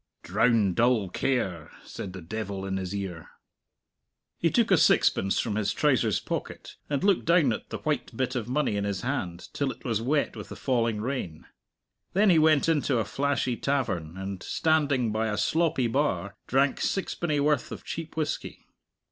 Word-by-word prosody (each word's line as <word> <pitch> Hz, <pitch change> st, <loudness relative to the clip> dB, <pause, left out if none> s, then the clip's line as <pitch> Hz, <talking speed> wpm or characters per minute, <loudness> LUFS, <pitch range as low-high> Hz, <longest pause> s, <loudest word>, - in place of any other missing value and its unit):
"Drown 105 Hz, +1 st, +2 dB
dull 115 Hz, -2 st, +2 dB
care," 95 Hz, -, -1 dB, 0.2 s
said 95 Hz, -, -7 dB
the 95 Hz, -3 st, -8 dB
devil 100 Hz, +1 st, -4 dB
in 95 Hz, 0 st, -2 dB
his 95 Hz, +1 st, -4 dB
ear. 90 Hz, -5 st, -5 dB, 1.1 s
He -, -, +3 dB
took -, -, +2 dB
a -, -, +6 dB
sixpence 95 Hz, 0 st, +3 dB
from 105 Hz, -3 st, -1 dB
his 105 Hz, -1 st, 0 dB
trousers 125 Hz, -, +2 dB
pocket, -, -, -5 dB
and 145 Hz, -2 st, -1 dB
looked 200 Hz, -2 st, +3 dB
down 165 Hz, -7 st, +4 dB
at -, -, -7 dB
the -, -, -4 dB
white -, -, -3 dB
bit 130 Hz, 0 st, -1 dB
of 120 Hz, -2 st, -3 dB
money 130 Hz, -5 st, 0 dB
in 100 Hz, -, -1 dB
his 100 Hz, -2 st, -2 dB
hand 95 Hz, -10 st, -3 dB
till 140 Hz, -2 st, -1 dB
it -, -, -9 dB
was 115 Hz, -3 st, 0 dB
wet 145 Hz, +5 st, 0 dB
with -, -, -8 dB
the -, -, -7 dB
falling 115 Hz, -5 st, 0 dB
rain. 110 Hz, -, -4 dB, 0.7 s
Then 200 Hz, +1 st, +5 dB
he 165 Hz, -, +5 dB
went 155 Hz, -2 st, +4 dB
into 145 Hz, -5 st, +2 dB
a 110 Hz, -, 0 dB
flashy 135 Hz, +2 st, 0 dB
tavern, 95 Hz, -, -2 dB
and, 95 Hz, -1 st, -5 dB
standing 145 Hz, -7 st, +1 dB
by 110 Hz, +1 st, 0 dB
a 105 Hz, -1 st, -2 dB
sloppy 160 Hz, -, +1 dB
bar, 120 Hz, -5 st, 0 dB
drank 135 Hz, +2 st, +2 dB
sixpenny 175 Hz, -5 st, -1 dB
worth 145 Hz, -2 st, +1 dB
of -, -, -7 dB
cheap 160 Hz, -1 st, -6 dB
whisky. 155 Hz, -2 st, -3 dB
120 Hz, 175 wpm, -27 LUFS, 100-145 Hz, 1.1 s, a